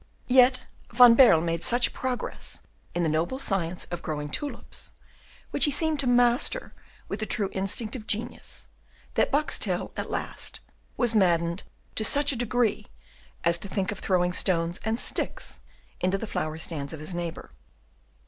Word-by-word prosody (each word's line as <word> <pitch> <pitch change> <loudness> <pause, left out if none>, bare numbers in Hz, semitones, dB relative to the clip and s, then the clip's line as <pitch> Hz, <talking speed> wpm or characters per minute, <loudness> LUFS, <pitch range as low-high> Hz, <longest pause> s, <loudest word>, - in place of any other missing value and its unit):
Yet 255 0 +5 0.3
Van 240 0 +8
Baerle 230 -10 +6
made 165 0 -2
such 240 +1 +3
progress 255 -1 -5 0.3
in 175 - 0
the - - +1
noble 165 +11 -1
science 185 -9 0
of 175 - -4
growing 150 -1 -4
tulips, 290 - -5 0.6
which - - +3
he - - +2
seemed 310 +1 +1
to 275 - -1
master 245 - +2 0.3
with - - -5
the 215 - -3
true 200 -3 -1
instinct 205 +4 -2
of 220 -4 -8
genius, 220 +3 -2 0.5
that - - +1
Boxtel 300 +2 0
at - - -5
last - - -4 0.4
was 240 -2 +2
maddened 170 -3 +2 0.3
to 220 - +2
such 285 +6 +5
a - - -2
degree 240 -1 0 0.6
as 170 0 +3
to 200 - -4
think 190 0 -2
of 205 - -6
throwing 180 -1 +1
stones 170 -2 +1
and 220 +1 -1
sticks - - -2 0.4
into 185 +2 0
the 225 - -5
flower 155 -6 -3
stands 155 -3 -4
of 160 - -7
his 155 +4 -5
neighbour. 170 -1 -5
205 Hz, 160 wpm, -26 LUFS, 170-245 Hz, 0.6 s, Van